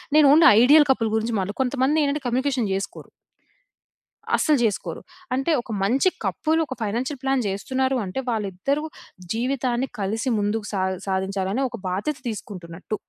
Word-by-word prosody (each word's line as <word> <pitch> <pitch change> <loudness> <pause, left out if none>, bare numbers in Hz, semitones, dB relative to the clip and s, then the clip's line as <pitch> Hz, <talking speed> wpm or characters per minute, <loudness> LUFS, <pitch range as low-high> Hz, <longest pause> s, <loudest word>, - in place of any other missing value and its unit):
నేను 305 -1 +7
only 320 +2 +7
ideal 295 +5 +7
couple 230 -4 +1
గురించి 220 +1 -1
మాట్లాడ 195 +2 -3
కొంతమందేంటంటే, 280 +3 +1
కమ్యూనికేషన్ 255 -2 0
జేసుకోరు. 195 +1 -5 1.3
అస్సలు 305 -2 +3
జేసుకోరు. 215 -4 -2 0.3
అంటే 270 +5 0
ఒక 235 - -10
మంచి 260 - +3 0.2
కపులు 320 +1 +1
ఒక 265 - -4
ఫైనాన్షియల్ 245 +6 -2
ప్లాన్ 270 -1 +1
జేస్తున్నారు 260 +7 -1
అంటే, 185 +7 -4
వాళ్ళిద్దరూ 220 +6 -1 0.5
జీవితాన్ని 250 +1 -1
కలిసి 220 +6 -1
ముందుకు 205 +1 -1
సా 195 - 0 0.3
సాధించాలని 190 +3 -1
ఒక 235 - -7
బాధ్యత 205 +11 -2
తీసుకుంటున్నట్టు. 190 -3 -6
240 Hz, 135 wpm, -23 LUFS, 200-270 Hz, 1.3 s, నేను